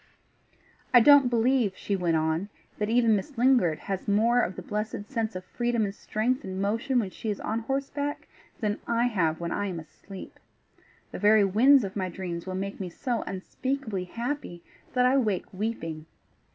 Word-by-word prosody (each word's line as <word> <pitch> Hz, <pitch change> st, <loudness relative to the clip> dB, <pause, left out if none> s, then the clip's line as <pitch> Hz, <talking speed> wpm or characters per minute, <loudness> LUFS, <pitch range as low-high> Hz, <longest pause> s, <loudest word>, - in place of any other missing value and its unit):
"I -, -, +11 dB
don't 280 Hz, +1 st, +7 dB
believe," 235 Hz, -4 st, +2 dB
she 200 Hz, -, -2 dB
went 175 Hz, -3 st, +1 dB
on, 160 Hz, +5 st, -1 dB, 0.3 s
"that 210 Hz, 0 st, 0 dB
even 230 Hz, -1 st, +4 dB
Miss 240 Hz, +7 st, -4 dB
Lingard 240 Hz, -11 st, +4 dB
has 195 Hz, -1 st, -4 dB
more 230 Hz, +4 st, +3 dB
of 185 Hz, -, -2 dB
the 185 Hz, -, -7 dB
blessed 210 Hz, +3 st, -4 dB
sense 225 Hz, -5 st, -2 dB
of 185 Hz, 0 st, -6 dB
freedom 240 Hz, -1 st, 0 dB
and 195 Hz, -, -4 dB
strength 225 Hz, +5 st, -1 dB
and 190 Hz, -1 st, -5 dB
motion 225 Hz, +7 st, 0 dB
when 205 Hz, -6 st, 0 dB
she 220 Hz, -, -5 dB
is 205 Hz, -, -2 dB
on 220 Hz, +1 st, -2 dB
horseback 275 Hz, +4 st, -3 dB, 0.3 s
than 210 Hz, -1 st, -1 dB
I 235 Hz, 0 st, +2 dB
have 170 Hz, -9 st, +1 dB
when 170 Hz, 0 st, -3 dB
I 205 Hz, 0 st, -1 dB
am 180 Hz, -3 st, -4 dB
asleep. 185 Hz, +5 st, -11 dB, 0.7 s
The -, -, -6 dB
very 210 Hz, 0 st, +5 dB
winds 250 Hz, +7 st, +5 dB
of 195 Hz, -1 st, -5 dB
my 190 Hz, -2 st, -1 dB
dreams 175 Hz, -1 st, -5 dB
will 185 Hz, -, -3 dB
make 195 Hz, +1 st, -4 dB
me 185 Hz, -2 st, -4 dB
so 240 Hz, +6 st, -2 dB
unspeakabably 220 Hz, +1 st, -3 dB
happy 235 Hz, -8 st, -4 dB, 0.3 s
that 250 Hz, -1 st, +3 dB
I 260 Hz, +2 st, +4 dB
wake 210 Hz, -8 st, 0 dB
weeping. 165 Hz, -7 st, -4 dB
210 Hz, 180 wpm, -27 LUFS, 185-245 Hz, 0.7 s, I